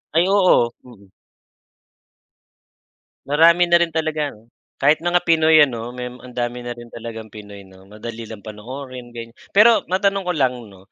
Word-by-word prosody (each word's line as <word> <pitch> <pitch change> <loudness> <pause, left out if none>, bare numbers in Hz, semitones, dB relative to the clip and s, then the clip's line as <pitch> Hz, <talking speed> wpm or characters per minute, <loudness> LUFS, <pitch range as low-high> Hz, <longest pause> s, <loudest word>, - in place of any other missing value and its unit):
Ay 170 +2 +4
oo, 185 -11 +4 0.2
mm. 105 -5 -16 2.2
Marami 165 +4 +4
na 170 - +6
rin 170 - +2
talagang 150 -8 -3 0.3
kahit 150 +3 +4
mga 175 +1 +1
Pinoy 160 -1 +5
ano, 120 -3 -4
may 125 0 -6
ang 125 0 -14
dami 120 0 -3
na 120 0 -6
rin 120 -1 -13
talagang 115 -2 -9
Pinoy 100 -2 -11
'no, 95 0 -18
madali 110 +2 -9
lang 105 -3 -10
panoorin 125 +3 -9
ganyan. 115 0 -8 0.2
Pero 225 +2 +6
matanong 195 0 0
ko 180 - 0
lang 130 -3 +1
'no, 95 0 -19
125 Hz, 155 wpm, -20 LUFS, 115-160 Hz, 2.2 s, na